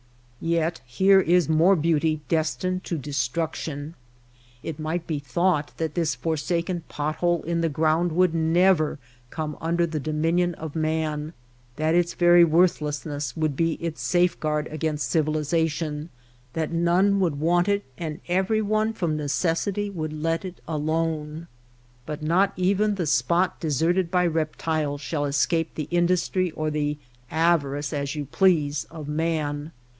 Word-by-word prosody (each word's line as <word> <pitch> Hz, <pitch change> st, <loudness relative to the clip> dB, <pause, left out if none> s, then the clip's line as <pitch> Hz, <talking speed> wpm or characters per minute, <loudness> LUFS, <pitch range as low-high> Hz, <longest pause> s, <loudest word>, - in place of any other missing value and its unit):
Yet 165 Hz, 0 st, 0 dB
here 190 Hz, +10 st, +5 dB
is 175 Hz, -3 st, +3 dB
more 165 Hz, +5 st, +4 dB
beauty 155 Hz, -1 st, +1 dB
destined 185 Hz, +3 st, -1 dB
to 170 Hz, -, -2 dB
destruc 145 Hz, +3 st, -2 dB
tion. 145 Hz, 0 st, -5 dB, 0.7 s
It 160 Hz, -1 st, -5 dB
might 160 Hz, +2 st, -2 dB
be 155 Hz, -4 st, -2 dB
thought 150 Hz, +3 st, 0 dB
that 160 Hz, -2 st, -2 dB
this 165 Hz, -3 st, 0 dB
forsaken 170 Hz, +2 st, -1 dB
pot 150 Hz, +1 st, -3 dB
hole 175 Hz, -2 st, +1 dB
in 170 Hz, +1 st, -1 dB
the 165 Hz, -, +1 dB
ground 160 Hz, +3 st, +1 dB
would 180 Hz, 0 st, +3 dB
never 165 Hz, -1 st, +3 dB, 0.3 s
come 155 Hz, 0 st, -4 dB
under 170 Hz, +1 st, +1 dB
the 160 Hz, -2 st, -3 dB
dominion 165 Hz, +4 st, 0 dB
of 160 Hz, -1 st, -7 dB
man, 155 Hz, -1 st, -1 dB, 0.4 s
that 155 Hz, +1 st, +1 dB
its 175 Hz, 0 st, +2 dB
very 175 Hz, 0 st, +6 dB
worthlessness 150 Hz, -3 st, +1 dB
would 155 Hz, -3 st, 0 dB
be 165 Hz, +2 st, +1 dB
its 165 Hz, -1 st, -5 dB
safeguard 160 Hz, -4 st, +1 dB
against 155 Hz, -1 st, -2 dB
civilization, 155 Hz, 0 st, 0 dB, 0.4 s
that 160 Hz, -1 st, -2 dB
none 175 Hz, +4 st, +3 dB
would 165 Hz, -7 st, 0 dB
want 175 Hz, +4 st, +2 dB
it, 200 Hz, 0 st, +1 dB
and 160 Hz, 0 st, -5 dB
everyone 215 Hz, +4 st, +1 dB
from 170 Hz, -7 st, -1 dB
necessity 165 Hz, +8 st, -1 dB
would 155 Hz, -4 st, -4 dB
let 165 Hz, +3 st, -1 dB
it 185 Hz, -2 st, -7 dB
alone. 155 Hz, 0 st, -2 dB, 0.6 s
But 155 Hz, 0 st, -5 dB
not 180 Hz, +5 st, +2 dB
even 200 Hz, +3 st, +2 dB
the 180 Hz, -4 st, -2 dB
spot 155 Hz, +6 st, +1 dB
de 165 Hz, -, -3 dB
serted 165 Hz, +5 st, +1 dB
by 180 Hz, 0 st, +2 dB
reptiles 155 Hz, -2 st, -1 dB
shall 145 Hz, 0 st, -2 dB
escape 150 Hz, +3 st, 0 dB
the 155 Hz, -2 st, -4 dB
industry 180 Hz, +1 st, +1 dB
or 155 Hz, -1 st, -3 dB
the 150 Hz, 0 st, -1 dB, 0.3 s
avarice 150 Hz, -3 st, +1 dB
(as 140 Hz, 0 st, -2 dB
you 145 Hz, -1 st, -3 dB
please) 150 Hz, -, +2 dB
of 155 Hz, -3 st, -8 dB
man. 150 Hz, -1 st, -2 dB
160 Hz, 145 wpm, -25 LUFS, 150-175 Hz, 0.7 s, very